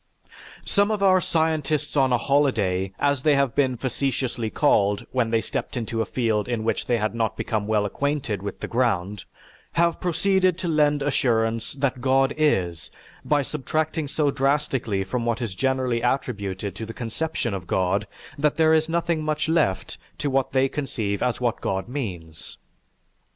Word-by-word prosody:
Some 200 0 +2
of 210 -2 0
our 185 -1 +5
"scientists 155 -3 0
on 135 -2 +3
a 125 - +4
holiday," 110 -9 +1
as 145 -2 +1
they 150 +1 +4
have 140 -3 +2
been 130 -3 +1
facetiously 130 -2 -2
called 105 -7 +2
when 125 -3 +1
they 115 0 +2
stepped - - -4
into 115 -1 -2
a 110 - -2
field 110 -4 0
in 120 -3 -2
which 115 - -1
they 120 - +2
had 110 0 -1
not 115 -2 -1
become 105 -2 -2
well 105 -1 +2
acquainted 135 -2 -2
with 100 - -6
the - - -3
ground, 105 -5 0 0.5
have 170 0 +1
proceeded 185 0 +2
to 185 - -4
lend 150 -3 +2
assurance 115 -5 0
that 135 -2 -1
God 135 +1 +3
is 90 - 0 0.3
by 145 -1 +2
subtracting 155 +3 -2
so 145 0 +1
drastically 135 -7 0
from 115 +5 -3
what 115 -1 0
is 115 -6 -3
generally 130 +1 0
attributed 100 -6 -2
to 110 - -5
the 115 - -8
conception 120 0 -2
of 90 -3 -5
God, 95 +3 0 0.3
that 150 +1 +1
there 160 -1 +5
is 160 0 +2
nothing 170 -1 0
much 155 0 -1
left 160 - 0 0.2
to 145 -2 -2
what 135 -1 +1
they 135 0 +3
conceive 110 -8 -3
as 125 -1 0
what 120 -2 -1
God 95 +2 -2
means. 90 - -6
130 Hz, 170 wpm, -24 LUFS, 110-150 Hz, 0.5 s, our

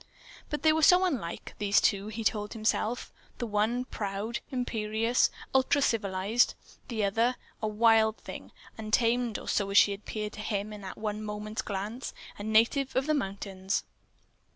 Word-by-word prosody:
But 295 - -3
they 315 -1 +6
were 320 - +1
so 360 +4 +6
unlike, 250 - -3
these 205 -1 +4
two, 200 +1 +1
he 220 +1 -5
told 210 -1 0
himself. 220 +1 -1 0.2
The 240 - -3
one 220 +3 0
proud, 210 +1 -3
imperious, 230 -2 +1 0.2
ultra 265 +2 +3
civilized; 210 -2 +2 0.3
the 225 -4 -2
other, 230 +5 +2 0.3
a 215 - 0
wild 220 0 +4
thing, - - -9 0.3
untamed, 230 +1 +1
or - - -9
so 200 -1 0
she 205 - +7
had 200 - -4
appeared 210 0 -5
to - - -9
him 210 -1 -2
in 210 - -8
that 190 -1 -7
one 210 0 -3
moment's 215 +2 -4
glance, 210 +3 -5 0.2
a - - -5
native 230 +6 +2
of 260 +1 +2
the 310 - +2
mountains. 195 -6 -2
220 Hz, 160 wpm, -29 LUFS, 205-245 Hz, 0.3 s, she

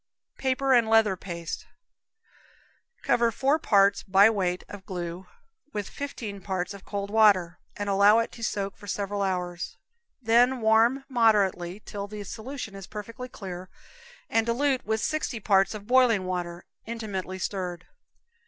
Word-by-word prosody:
Paper 265 0 +1
and 235 -3 +4
Leather 220 -3 +4
Paste. 170 -3 -6 1.4
Cover 235 -1 +3
four 275 +7 +1
parts, 200 -7 +4
by 195 +3 +5
weight, 185 -4 -1
of 205 -2 -10
glue, 180 -1 -6 0.5
with 205 -2 -3
fifteen 225 -8 -6
parts 185 0 -3
of 200 -1 -11
cold 200 -1 -4
water, 200 -6 +4 0.2
and 205 - -3
allow 200 +2 +5
it 230 - 0
to 230 - -10
soak 200 -2 -2
for 205 - -14
several 200 +1 -2
hours, 180 -2 -3 0.4
then 245 +2 +3
warm 230 +4 +3
moderately 205 -6 +2
till 200 -1 -5
the 210 0 -7
solution 235 +2 -7
is 195 -1 -9
perfectly 230 +4 -7
clear, 185 -4 -8 0.6
and 225 0 +1
dilute 260 +2 +1
with 220 0 0
sixty 310 -6 -2
parts 195 0 +3
of 205 -1 -8
boiling 240 -5 +4
water, 175 -1 -4 0.2
intimately 205 -5 -4
stirred 180 -2 -3
in. - - -26
205 Hz, 145 wpm, -27 LUFS, 190-230 Hz, 1.4 s, by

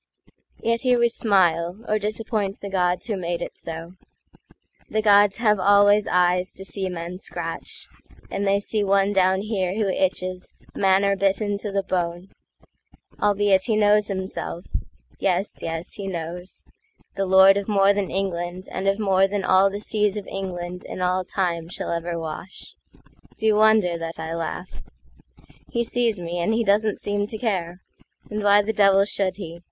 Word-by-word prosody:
Yet 230 0 +1
here 250 -2 +3
we 235 0 +3
smile, 190 -2 +1
or 215 0 +1
disappoint 210 -1 -3
the 200 - -6
godsWho 185 +3 0
made 175 -1 -3
it - - -8
so: 165 +1 -7 1.0
the 215 - 0
gods 205 -1 +5
have 210 -3 +2
always 205 +2 +5
eyesTo 180 +1 +1
see 195 -1 -2
men 175 +1 -6
scratch; 165 -3 -5 0.4
and 200 0 -2
they 200 +1 +3
see 210 +1 -1
one 200 0 +2
down 190 0 +2
hereWho 200 -1 -1
itches, 185 -1 -2 0.2
manor 195 +1 +3
bitten 200 +1 0
to 210 -1 -4
the 195 0 0
bone, 175 0 -3 0.9
Albeit 205 -2 +3
he 225 - +1
knows 210 0 +3
himself—yes, 185 - -4
yes, 165 +1 -4
he 200 -2 -5
knows—The 180 +2 -7
lord 190 +1 +7
of 200 -1 -2
more 200 -1 +4
than 200 -1 -2
England 180 -1 -3
and 190 +1 -3
of 195 0 +2
moreThan 195 -1 +1
all 190 +1 +5
the 200 +1 -5
seas 210 -1 +1
of 205 - -5
England 180 -2 -6
in 185 - -5
all 185 +1 +1
timeShall 170 -3 -2
ever 170 0 -3
wash. 165 +3 -7 0.6
D'ye 220 0 +2
wonder 210 -5 +3
that 165 0 -6
I 160 0 -5
laugh? 170 +2 -5 0.9
He 235 - 0
sees 230 -3 0
me, 175 0 -4
and 195 +6 +1
he 230 - +1
doesn't 210 0 +2
seem 205 0 -1
to 220 - -6
care; 185 -6 -2 0.5
And 210 0 -3
why 205 0 +5
the 220 +2 -2
devil 195 -1 +4
should 195 -2 -1
he? 170 -4 -8
195 Hz, 155 wpm, -23 LUFS, 180-205 Hz, 1.0 s, lord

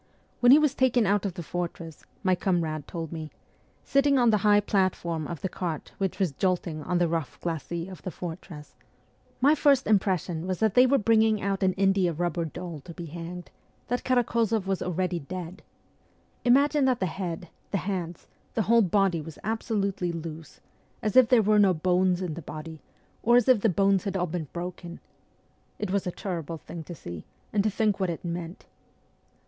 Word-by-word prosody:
' - - -38
When 245 0 +6
he 280 - +10
was 300 -3 +3
taken 250 -4 +3
out 200 0 +2
of 185 - -6
the 175 - -5
fortress,' 170 -2 -5 0.2
my 185 -1 +3
comrade 170 -5 -1
told 165 -3 -5
me, 160 -2 -6 0.3
' - - -37
sitting 275 0 +4
on 240 -3 +4
the 215 - +4
high 205 0 +5
platform 185 -6 0
of 170 - -6
the - - -1
cart 175 -4 -5
which 195 -2 -1
was 190 -6 +1
jolting 170 0 -1
on 180 +4 -1
the 175 - +3
38 165 - -2
rough 165 -5 -3
glacis 170 +1 -4
of 185 - -10
the - - -4
fortress, 165 -3 -8 0.7
my 285 +4 +6
first 285 -3 +3
impression 185 -4 +1
was 185 -1 -1
that 220 -3 +2
they 250 +1 +6
were 275 +2 +4
bringing 220 -1 +3
out 195 0 -1
an 190 -1 +3
india 195 -2 +2
rubber 170 0 -1
doll 170 0 -7
to 170 +4 -11
be 175 - -6
hanged, 170 +2 -8 0.4
that 245 +1 -1
Karak6zoff 230 -4 +1
was 195 -1 -1
already 180 0 -1
dead. 175 +3 -7 0.8
Imagine 280 +3 +4
that 255 -2 +2
the 190 - +1
head, 175 -1 -4 0.2
the 200 - 0
hands, 175 -4 -4 0.3
the 225 - +2
whole 230 +3 +5
body 195 -3 +2
were 160 +2 -8
absolutely 200 -4 -1
loose, 165 -1 -8 0.4
as 215 -2 -1
if 255 -3 +7
there 245 -4 +5
were 210 +1 +4
no 195 -3 +5
bones 180 +2 +2
in 175 -4 -3
the 170 - -7
body, 155 +1 -8 0.4
or 240 +1 +4
as 245 -2 +4
if 255 -5 +5
the 225 - +3
bones 195 +1 +2
had 195 -1 -1
all 180 - +1
been 165 -2 -4
broken. 175 0 -6 0.8
It 210 -3 -3
was 195 -1 0
a - - -1
terrible 170 -4 -5
thing 165 +1 -9
to 175 - -8
see, 85 - -8 0.3
and 205 -2 +2
to 215 - +2
think 210 0 0
what 190 -2 0
it 170 +1 -5
meant. 170 +1 -5
185 Hz, 195 wpm, -27 LUFS, 170-210 Hz, 0.8 s, he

